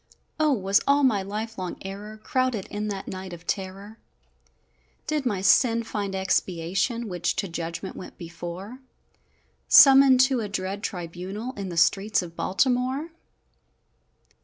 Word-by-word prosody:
O, 310 -1 +3
was 200 -5 +2
all 285 +1 +4
my 220 -7 +3
life 215 +2 -5
long 185 -1 -4
error 205 +3 -7
Crowded 250 -2 -1
in 210 +1 -3
that 200 -2 -5
night 185 -1 -7
of 175 0 -11
terror? 195 +3 -5 1.1
Did 300 -4 -1
my 200 -5 -1
sin 230 +4 +4
find 205 -3 -4
expiation, 190 +5 -1
Which 175 -3 -2
to 195 - -2
judgment 170 +2 -5
went - - -10
before, 175 +7 -8 0.9
Summoned 270 -2 +8
to 260 -1 +3
a 210 -2 -4
dread 195 +1 -3
tribunal, 190 +6 -5
In 200 -6 -6
the 170 - -6
streets 195 +4 +2
of 170 -1 -10
Baltimore? 255 - 0
200 Hz, 135 wpm, -25 LUFS, 185-240 Hz, 1.1 s, Summoned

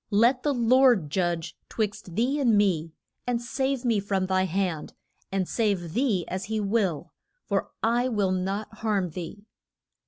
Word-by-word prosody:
Let 235 +5 +4
the 295 - +1
Lord 240 - +4
judge 175 -2 -1
'twixt 205 -5 -3
thee 255 +7 +1
and 235 -6 +4
me, 170 -6 +2 0.4
and 245 -1 +1
save 265 +2 -2
me 230 -4 +3
from 195 -1 0
thy 185 0 +2
hand, 180 -3 -2 0.4
and 190 -2 0
save 195 -8 0
thee 225 -7 +1
as 185 +1 -3
he 220 +1 -2
will, 195 -6 0 0.3
for - - -1
I 240 +3 +2
will 205 -6 +1
not 195 +4 -2
harm 200 -6 0
thee. 185 +5 -7
205 Hz, 155 wpm, -26 LUFS, 185-235 Hz, 0.4 s, Let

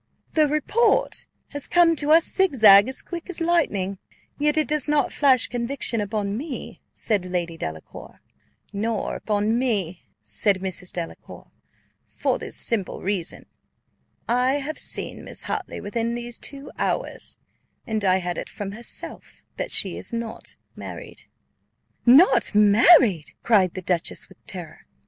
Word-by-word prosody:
"The 310 -1 +4
report 420 - +1 0.2
has 285 -2 -3
come 345 -1 +4
to 290 0 -1
us 325 +2 +6
zigzag 220 - +6
as 265 - -4
quick 345 +1 -8
as 365 - -4
lightning, 215 - 0 0.4
yet 300 +1 +2
it 310 - +2
does 300 -1 0
not 295 -3 +1
flash 265 -4 +4
conviction 240 -1 -2
upon 205 -1 -2
me," 275 +3 -7
said 205 -4 -1
Lady 175 -2 -3
Delacour. 80 - -8 0.5
"Nor 215 +1 -2
upon 215 +2 0
me," 200 -9 -1 0.2
said 200 -3 +2
Mrs. 185 -1 -3
Delacour, 170 -2 -7 0.6
"for - - -2
this - - -4
simple 215 -5 +1
reason. 185 -3 -2 0.8
I 250 +2 +2
have 290 +2 -3
seen - - -2
Miss - - -3
Hartley - - -4
within 230 +3 -3
these 240 0 -6
two 280 0 -4
hours, - - -3 0.5
and 220 -4 -2
I 185 -1 +3
had 175 -1 -3
it - - -7
from 200 -1 -6
herself 235 +3 -4
that - - -3
she - - 0
is - - -3
not 230 -1 -5 0.2
married." - - -9 0.8
"Not 265 - +6
married!" 210 - +5
cried 195 -6 +3
the 185 - -6
dowager 175 -1 -1
with 190 - -20
terror. 175 -4 -8
230 Hz, 140 wpm, -23 LUFS, 195-285 Hz, 0.8 s, us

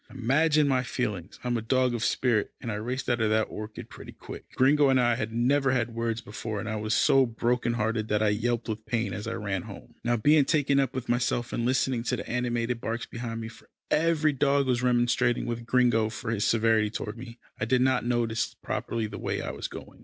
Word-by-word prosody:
Imagine 150 +5 +2
my 130 -2 +2
feelings 105 -8 -4
I - - -4
am 120 -1 +1
a - - -3
dog 125 +2 +1
of 115 -2 -2
spirit, 115 -5 +1
and 115 - -4
I - - -2
raced 125 +5 -3
out 120 -1 +1
of 110 - +2
that 110 0 +3
orchard 105 0 -7
pretty - - -10
quick. - - -10
Gringo 140 +2 +4
and 130 -1 +4
I 120 -1 +3
had 115 -2 -3
never 135 +4 +2
had 120 -2 0
words 115 0 -2
before, 110 -2 -5
and 110 - -5
I 110 - -2
was 110 +1 -1
so 135 -1 +4
broken 120 +1 0
hearted 110 -1 -1
that 105 0 +1
I 105 - +3
yelped 115 +3 -1
with 110 -1 -5
pain 115 -1 -1
as 105 +2 -5
I 115 - -2
ran 100 -4 -2
home. - - -11
Now, 120 0 +1
being 150 +7 +5
so - - +1
taken 140 -1 +2
up 135 -2 0
with 130 -2 -4
myself, 120 0 0
and 120 - 0
listening 130 -1 +1
to - - 0
the - - -6
animated 120 -1 -1
barks 115 +1 -3
behind 115 -1 -5
me, 110 - -5
for 115 - -15 0.2
every 155 -1 +2
dog 140 0 +2
was 125 -2 +1
remonstrating 120 0 +2
with 120 -1 -4
Gringo 120 -3 +3
for 115 +1 -5
his 110 -1 0
severity 110 -1 +3
toward 105 0 -5
me, 120 0 -10 0.2
I 110 - 0
did 125 +2 +2
not 130 0 +2
notice 115 -2 -1
properly 115 -1 -3
the 105 -1 -7
way - - -2
I - - -3
was - - -5
going. - - -11
120 Hz, 235 wpm, -27 LUFS, 110-125 Hz, 0.2 s, being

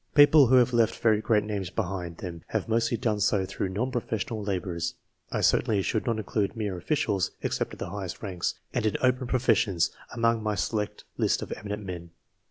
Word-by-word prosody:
People 145 -1 +8
who 130 - +5
have 125 -1 +5
left 115 -2 +3
very 110 -2 +3
great 105 -2 +2
names 100 -4 -3
behind 90 -4 -3
them 85 -3 -7
have - - -2
mostly 115 +1 +1
done 110 -3 0
so 100 -1 +2
through 95 - -3
non 115 +8 -1
professional 115 -2 -2
labours. 90 -4 -2 0.4
I - - -1
certainly 105 -5 +3
should 110 +6 -1
not 115 -2 +1
include 105 -1 -1
mere 105 -4 -2
officials, 95 - 0
except - - -1
of - - -9
the - - -5
highest 95 -3 -5
ranks, 90 -4 -2 0.2
and - - 0
in 105 - 0
open 125 0 +2
professions, 115 -8 +2 0.2
among 115 -1 +1
my 105 -1 -1
select 105 +3 -2 0.2
list - - +2
of - - -8
eminent 105 +1 -5
men. 85 -2 -6
105 Hz, 190 wpm, -27 LUFS, 95-115 Hz, 0.4 s, People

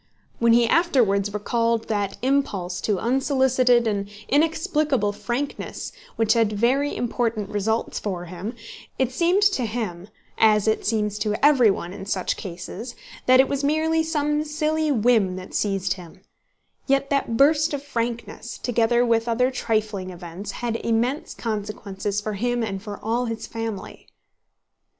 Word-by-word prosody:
When 235 0 +5
he 235 0 +5
afterwards 225 - +2
recalled 230 +2 0
that 205 -2 -1
impulse 210 -10 0
to 210 -3 0
unsolicited 255 0 +3
and 200 -2 -1 0.2
inexplicable 300 -6 +2
frankness 255 +6 -4 0.2
which 225 -1 +3
had 225 -2 +2
very 255 +7 +1
important 230 -4 -1
results 220 +2 -1
for 180 -4 -4
him, 185 +7 -6 0.4
it 260 -2 +1
seemed 350 +8 +2
to 395 -11 +3
him—as 210 0 0
it 220 - +1
seems 210 -1 0
to 210 0 0
everyone 225 -11 +4
in 195 -1 -8
such 190 -2 -1
cases—that 235 +7 -2
it 265 - +6
was 280 0 -2
merely 315 +2 +2
some 300 -2 0
silly 310 0 0
whim 220 -6 +3
that 185 0 -9
seized 195 -2 0
him: 185 0 -13 0.7
yet 275 0 +1
that 275 -5 0
burst 305 +3 +4
of 285 -1 -3
frankness, 235 -3 -4
together 240 0 +2
with 230 -1 +2
other 250 +3 +2
trifling 215 -6 -1
events, 175 +2 -8
had 230 -1 0
immense 245 +9 -1
consequences 205 -2 -3
for 210 +1 -4
him 240 +3 -1
and 195 -3 -3
for 205 -1 -7
all 235 +3 0
his 225 -1 -4
family. 225 -3 -6
230 Hz, 140 wpm, -24 LUFS, 205-265 Hz, 0.7 s, it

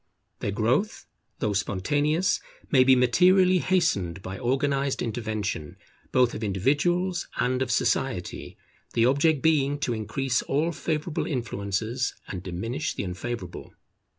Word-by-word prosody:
Their - - -2
growth, 120 - 0 0.3
though 105 - -1
spontaneous, 145 - +1 0.3
may 130 -3 +6
be 130 0 +6
materially 180 +9 +5
hastened 100 - 0
by 95 +1 -6
organized 135 +2 0
intervention, 110 -8 -3 0.3
both 125 -2 +3
of 110 - -5
individuals 160 - +1
and 125 +1 +1
of 130 - 0
society, - - -1 0.4
the 115 - +4
object 140 +2 +3
being 145 -3 +3
to 120 - 0
increase 115 +3 -1
all 155 +5 0
favourable 155 +1 -2
influences 115 - -2
and 95 - -5
diminish 115 - -3
the - - -3
unfavourable. 95 +1 -6
130 Hz, 125 wpm, -26 LUFS, 105-150 Hz, 0.4 s, may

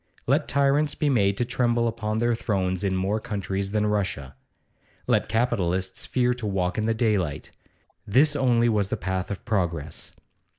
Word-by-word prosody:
Let - - +2
tyrants 140 +1 +2
be 150 - 0
made 100 -5 +2
to 120 - 0
tremble 120 -1 +1
upon 110 -1 -2
their 120 +1 +2
thrones 95 -5 -1
in 95 -1 0
more 95 +3 0
countries 100 -2 -3
than 105 +1 0
Russia. 95 -10 -2 0.7
Let - - +1
capitalists 95 -6 0
fear 125 -1 +2
to 120 -3 -5
walk 95 0 -1
in 110 - 0
the 115 - +1
daylight. 105 - -1 0.6
This 145 +8 +4
only 120 -4 +3
was 105 -4 +1
the 110 - -1
path 95 -2 -3
of 100 +3 -6
progress. 85 -9 -2
105 Hz, 165 wpm, -25 LUFS, 95-120 Hz, 0.7 s, This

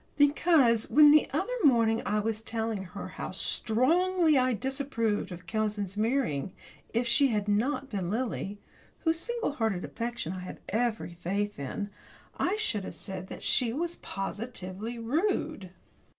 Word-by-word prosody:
Because 285 -5 +4
when 295 0 +8
the 305 0 +5
other 375 - -1
morning 230 -5 +4
I 210 +2 +1
was 220 +1 -1
telling 225 -3 -3
her 180 - -7
how - - -6
strongly 325 +8 +2
I 255 -1 +3
disapproved 230 -5 -1
of 180 0 -8
cousins 210 -2 -2
marrying, 215 - 0 0.4
if 235 +2 +1
she 275 +4 +4
had 210 -4 -1
not 260 +6 0
been 190 -5 -2
Lily 215 -2 -2 0.4
whose 325 0 +1
single 475 +1 -2
hearted 220 -9 -1
affection 235 -7 -4
I 185 - -5
have 180 - -7
every 220 -4 -1
faith 200 +4 -2
in 200 +9 -4 0.4
I 385 - 0
should 245 - 0
have - - -7
said 190 -2 -5
that - - -9
she 235 -3 +2
was 340 +5 -2
positively 205 +1 -5
rude. 300 - -1
230 Hz, 150 wpm, -29 LUFS, 205-280 Hz, 0.4 s, when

